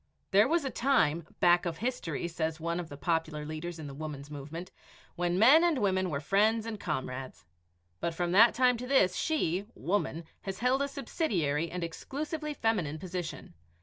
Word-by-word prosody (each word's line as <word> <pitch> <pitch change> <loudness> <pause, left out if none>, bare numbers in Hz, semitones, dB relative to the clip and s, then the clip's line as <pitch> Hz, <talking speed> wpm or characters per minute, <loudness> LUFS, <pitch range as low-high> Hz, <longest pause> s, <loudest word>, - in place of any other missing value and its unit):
There 205 +3 +6
was 325 0 +1
a 265 - -2
time 170 - +2
"back 175 0 +4
of 165 -1 -3
history," 205 - -2
says 160 -1 -2
one 170 +2 -2
of 170 -2 -6
the 145 - -8
popular 160 -1 -1
leaders 155 +3 -5
in 160 - -7
the 140 - -7
Woman's 145 -1 -7
movement, 150 +5 -7 0.4
"when 175 0 0
men 265 - +7
and 340 -4 +3
women 190 -4 +1
were 140 -3 -2
friends 215 +8 +2
and 225 -2 -5
comrades 130 - -4 0.5
but 170 -1 -2
from 175 0 -1
that 225 +5 +6
time 250 -1 +4
to 250 +2 -6
this 195 -9 +4
she 200 - 0
(woman) 170 -3 -1 0.2
has 195 -1 -5
held 250 +3 +2
a 280 - +1
subsidiary 180 - -1
and 180 +1 -4
exclusively 300 - -4
feminine 200 - 0
position. 180 - -6
175 Hz, 180 wpm, -30 LUFS, 160-230 Hz, 0.5 s, men